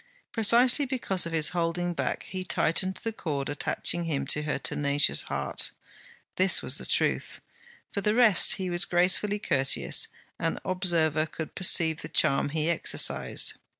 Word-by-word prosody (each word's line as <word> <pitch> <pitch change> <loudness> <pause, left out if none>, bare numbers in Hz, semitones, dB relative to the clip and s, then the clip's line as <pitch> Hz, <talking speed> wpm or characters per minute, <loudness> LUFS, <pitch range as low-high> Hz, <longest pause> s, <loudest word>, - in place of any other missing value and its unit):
precisely 240 +4 +3
because 240 -10 -1
of - - -7
his 160 -2 +2
holding 175 0 -2
back - - -4
he 185 -1 -6
tightened 185 +1 0
the 225 - -3
cord 145 -9 -4
attaching 170 +3 -2
him 155 -4 -2
to 150 - +1
her 150 0 -3
tenacious 145 +1 +2
heart. - - 0 0.7
This 185 0 +4
was - - +4
the - - 0
truth. - - -1 0.5
For 200 - -4
the 210 +2 0
rest, 230 -7 +5
he 185 -2 -5
was 175 +1 +2
gracefully 190 +3 +1
courteous; 135 -9 0 0.3
an - - -3
observer 165 -4 0
could 160 0 -8
perceive 165 -3 +3
the - - -7
charm 135 +1 +1
he 155 +1 -2
exercised. 170 -1 0
175 Hz, 150 wpm, -26 LUFS, 155-195 Hz, 0.7 s, rest